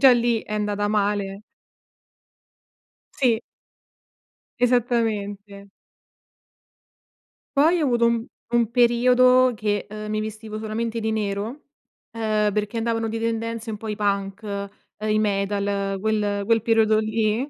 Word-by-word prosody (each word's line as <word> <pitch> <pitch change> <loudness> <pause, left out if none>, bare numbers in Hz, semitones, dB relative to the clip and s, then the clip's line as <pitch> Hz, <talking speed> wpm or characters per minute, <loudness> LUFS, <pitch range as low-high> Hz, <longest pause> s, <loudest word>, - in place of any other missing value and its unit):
già 265 -2 +8
lì 235 -2 +1
è 215 - -9
andata 205 -1 -1
male. 205 -1 -1 1.8
Sì. 240 -4 +3 1.2
Esattamente. 215 -5 0 1.9
Poi 325 +4 +4
ho - - +2
avuto 240 -2 +2
u 235 +1 +1 0.2
un 235 -1 +2
periodo 250 +1 +5
che, 205 -1 -1
ehm, 215 0 -6
mi 215 0 -1
vestivo 215 0 -6
solamente 225 +1 -3
di 220 0 -1
nero, 215 +6 -3 0.5
ehm, 215 -2 0
perché 210 +2 -2
andavano 225 0 0
di 225 +1 -3
tendenze 230 0 -3
un 210 - -5
po' 220 - -8
i 210 - -2
punk, 200 0 -2 0.3
i 215 0 +1
metal, 200 -1 -1
quel 205 -1 0
quel 225 -1 +3
periodo 220 -1 +3
lì. 220 +4 0
220 Hz, 120 wpm, -23 LUFS, 205-230 Hz, 1.9 s, già